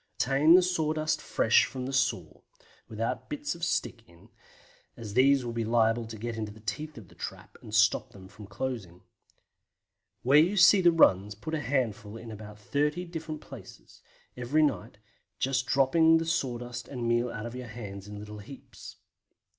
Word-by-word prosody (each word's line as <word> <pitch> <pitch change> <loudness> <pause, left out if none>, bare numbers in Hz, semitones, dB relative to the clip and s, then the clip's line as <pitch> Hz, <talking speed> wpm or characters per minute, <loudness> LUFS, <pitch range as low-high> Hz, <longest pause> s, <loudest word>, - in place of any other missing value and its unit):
Obtain 140 +6 +4
the 185 - +6
sawdust 155 -3 0
fresh 110 - +3
from 130 - -7
under 125 - -4
the - - -8
saw, 130 -1 -1 0.5
without 115 +1 -4
bits 295 0 -3
of 170 0 -11
stick 170 -7 -1
in, 85 0 -20 0.7
as 105 -3 -8
these 135 +1 +4
would 120 - -4
be 115 0 -2
liable 115 0 +1
to 110 0 -8
get 115 +2 -5
into 110 -2 -4
the 110 - -14
teeth 150 +8 -5
of 110 -6 -11
the - - -19
trap - - -8
and 110 - -7
stop 110 -1 +3
them 95 -1 -14
from 105 +1 -13
closing. 100 -5 -5 1.2
Where 140 +4 +6
you 180 +6 +2
see 190 +2 +7
the 175 -1 +6
runs 105 - +3
put 155 +10 -7
a 160 - 0
handful 115 -6 -2
in 115 0 -10
say - - -7
about 105 0 -10
30 150 +9 -1
different 160 -3 -6
places, - - -13 0.3
every 125 +6 +1
night, 120 -7 -1 0.4
just 130 -1 -1
dropping 160 +5 +4
the 165 - -2
sawdust 125 -6 -3
and 125 -4 -4
meal 120 +1 +1
out 105 -1 -6
of 120 - -6
your 125 -1 -7
hands 105 -3 -8
in 105 0 -8
little 105 0 -9
heaps. 130 +6 -12
120 Hz, 185 wpm, -28 LUFS, 110-150 Hz, 1.2 s, see